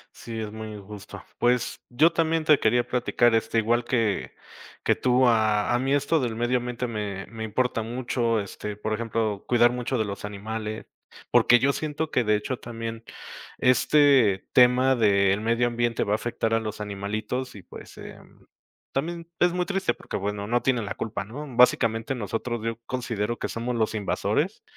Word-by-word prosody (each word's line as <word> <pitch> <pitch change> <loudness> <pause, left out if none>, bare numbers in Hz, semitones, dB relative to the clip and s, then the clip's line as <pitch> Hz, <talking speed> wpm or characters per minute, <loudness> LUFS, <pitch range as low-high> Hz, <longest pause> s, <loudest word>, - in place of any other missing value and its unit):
Sí, 115 -1 -7
es 105 -1 -5
muy 110 0 -7
injusto. 105 -1 -10 0.2
Pues, 120 0 +1
yo 155 +7 +4
también 165 -1 +1
te 150 -2 +5
quería 120 +2 +2
platicar, 120 -1 +2
este, 115 0 +1
igual 115 +2 +2
que 115 -5 -1 0.5
que - - +4
tú, 125 +1 +3
a 110 -3 +2
a - - +3
mí 135 +2 +1
esto 145 +3 +2
del 120 -4 -2
medio 120 +2 +1
ambiente 125 0 -4
me 105 -4 -4
me 110 +1 -6
importa 115 +1 -1
mucho. 120 0 -1
Este, 100 +1 -6
por 105 +1 -3
ejemplo, 110 -2 -2
cuidar 120 0 +4
mucho 125 +1 -2
de 110 - +1
los 100 -1 -6
animales, 110 +1 -5 0.5
porque 120 - +6
yo 140 +4 +2
siento 155 +1 -3
que, 125 - +1
de 105 -1 +3
hecho, 120 +4 -4
también 115 -1 -6 0.5
este 130 -5 +4
tema 125 +1 +5
del 100 -3 +3
medio 115 +2 +1
ambiente 120 -1 0
va 100 - -1
a - - +4
afectar 115 0 -2
a 115 - +2
los 110 -1 -6
animalitos. 105 +5 -4
Y, 100 - -11
pues, - - -12
em, - - -13 0.5
también 170 +4 -3
es 175 0 +4
muy 180 0 0
triste, 195 +1 0
porque, - - -6
bueno, 100 +1 -3
no 120 +3 +1
tienen 125 -4 +1
la 100 - -4
culpa, 105 -3 -4
¿no? 135 +9 -8
Básicamente, 115 0 +3
nosotros, 115 +1 -3
yo 115 0 -2
considero 120 -3 -3
que - - -3
somos 120 +1 -3
los 110 -1 0
invasores. 110 - -1
115 Hz, 180 wpm, -25 LUFS, 110-125 Hz, 0.5 s, porque